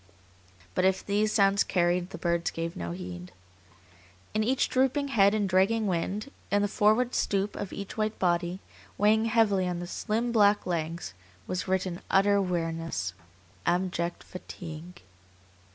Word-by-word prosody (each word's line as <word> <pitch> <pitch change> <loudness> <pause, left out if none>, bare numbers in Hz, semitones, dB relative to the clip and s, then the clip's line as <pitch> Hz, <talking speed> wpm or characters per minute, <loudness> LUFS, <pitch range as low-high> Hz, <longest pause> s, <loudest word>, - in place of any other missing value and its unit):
But - - +1
if 190 0 +2
these 210 +1 +1
sounds 200 -1 +4
carried, 175 0 +1
the - - -7
birds 170 -1 0
gave 165 0 -4
no 85 0 -4
heed. 90 0 -7 1.0
In 215 0 +1
each 255 +4 +2
drooping 265 +2 +1
head 200 -4 +4
and 205 -2 +1
dragging 195 +4 +2
wing, 190 +3 -1 0.3
in 205 0 +2
the - - +2
forward 215 +5 +2
stoop 200 +1 0
of 195 - -5
each 200 +2 -7
white 215 0 -1
body, 175 +1 0 0.4
weighing 220 +2 +4
heavily 215 -5 +3
on 180 -1 -2
the 175 - -5
slim, 225 +6 -2
black 205 -2 +4
legs, 165 - -3 0.3
was 185 +1 -3
written 185 -1 -1
utter 200 +1 +4
weariness, 165 - -2 0.5
abject 175 -1 0
fatigue. 175 -1 -9
190 Hz, 145 wpm, -28 LUFS, 175-210 Hz, 1.0 s, sounds